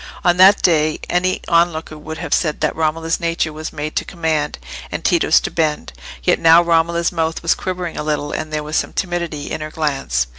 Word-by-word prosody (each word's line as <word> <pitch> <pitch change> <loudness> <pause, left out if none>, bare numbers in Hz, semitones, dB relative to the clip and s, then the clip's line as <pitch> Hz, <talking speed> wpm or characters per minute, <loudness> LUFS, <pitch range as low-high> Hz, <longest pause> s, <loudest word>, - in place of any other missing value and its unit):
On 175 0 +4
that 190 +2 +6
day, 155 -3 +2
any 185 +1 +1
on 170 +1 +4
looker 160 -1 -7
would 155 +1 -8
have 165 -3 -3
said 155 -3 0
that - - 0
Romola's 160 +1 -1
nature 165 -2 -1
was 155 +1 -6
made 150 +1 -5
to - - +1
command, 160 -3 -2 0.3
and - - -5
Tito's - - +4
to - - -4
bend; 150 - -1 0.3
yet - - +2
now 165 0 +7
Romola's 170 0 +1
mouth 165 -2 -2
was 165 - +3
quivering 180 -2 -5
a - - -3
little, 150 -1 -2
and 155 - -4
there 150 0 -2
was 150 +1 -5
some - - -2
timidity 170 -5 -3
in - - -4
her 155 - -5
glance. 135 - -1
160 Hz, 210 wpm, -18 LUFS, 155-170 Hz, 0.3 s, now